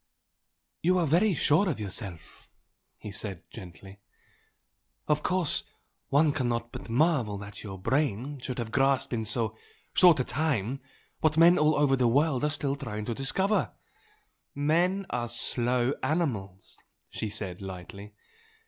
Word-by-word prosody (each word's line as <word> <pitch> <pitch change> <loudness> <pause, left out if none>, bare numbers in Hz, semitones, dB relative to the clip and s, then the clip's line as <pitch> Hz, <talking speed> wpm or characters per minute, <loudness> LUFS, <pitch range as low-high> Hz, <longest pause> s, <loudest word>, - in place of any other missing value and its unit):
"You 180 +2 +3
are 175 - +2
very 175 +6 +3
sure 165 +7 +3
of 150 - -2
yourself" 95 -5 -8 0.5
he 105 - -8
said, 100 -3 -5
gently. 95 0 -11 1.1
"Of 150 0 +2
course 180 -3 +1 0.5
one 145 +2 +4
cannot 120 -4 -2
but - - -9
marvel 125 -5 +2
that 100 0 -9
your 95 -3 -7
brain 135 +4 -1
should 125 0 -5
have 115 -2 -4
grasped 135 0 +2
in 110 -2 -1
so 110 0 0 0.4
short 175 -5 +6
a - - +2
time 135 -4 -1 0.4
what 155 0 +2
men 170 +2 +7
all 150 0 +4
over 145 -2 +3
the 125 -2 +2
world 140 +2 +2
are 150 - +2
still 145 -1 -1
trying 105 -7 -5
to 120 - -2
discover 190 - 0 0.4
" - - -44
"Men 175 +7 +1
are 120 -1 -2
slow 120 +2 +2
animals!" 110 - -2 0.3
she 110 - -4
said, 100 -4 -5
lightly. 95 +2 -9
130 Hz, 145 wpm, -28 LUFS, 105-155 Hz, 1.1 s, men